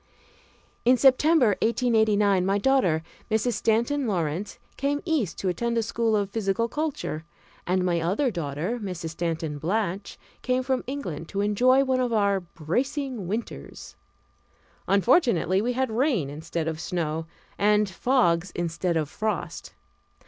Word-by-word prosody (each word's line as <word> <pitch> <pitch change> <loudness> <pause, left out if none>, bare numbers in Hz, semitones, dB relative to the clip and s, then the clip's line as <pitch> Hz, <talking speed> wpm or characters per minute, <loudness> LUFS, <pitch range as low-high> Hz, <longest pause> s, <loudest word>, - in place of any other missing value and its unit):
In 250 +2 +5
September, 270 0 +5
1889, 220 -5 +3
my 195 +2 +1
daughter, 200 -9 +2 0.3
Mrs. 220 +2 +1
Stanton 235 +6 +1
Lawrence, 175 0 -2 0.2
came 285 +1 0
East 295 - 0
to 195 - -3
attend 235 +6 -1
a 230 - +2
school 225 0 0
of 200 -2 -1
physical 220 +1 0
culture, 280 - -3 0.4
and 180 0 +1
my 170 -2 +1
other 205 - +1
daughter, 170 - -3
Mrs. 180 -5 -4
Stanton 165 -3 -3
Blatch, 195 +3 -2 0.2
came 255 0 0
from 260 0 -1
England 180 - -5
to 200 - -2
enjoy 250 +6 +4
one 260 -1 +1
of 250 -1 0
our 200 -2 +2
bracing 220 - -3
winters. 220 +5 -6 0.9
Unfortunately 200 - +3
we 245 +3 0
had 260 -1 -1
rain 225 - +1
instead 160 +2 -4
of 160 -1 -3
snow, 160 -2 -3 0.3
and 210 +1 +3
fogs 190 -4 +1
instead 170 0 -1
of 155 -2 0
frost. 215 +7 -4
205 Hz, 135 wpm, -26 LUFS, 175-250 Hz, 0.9 s, In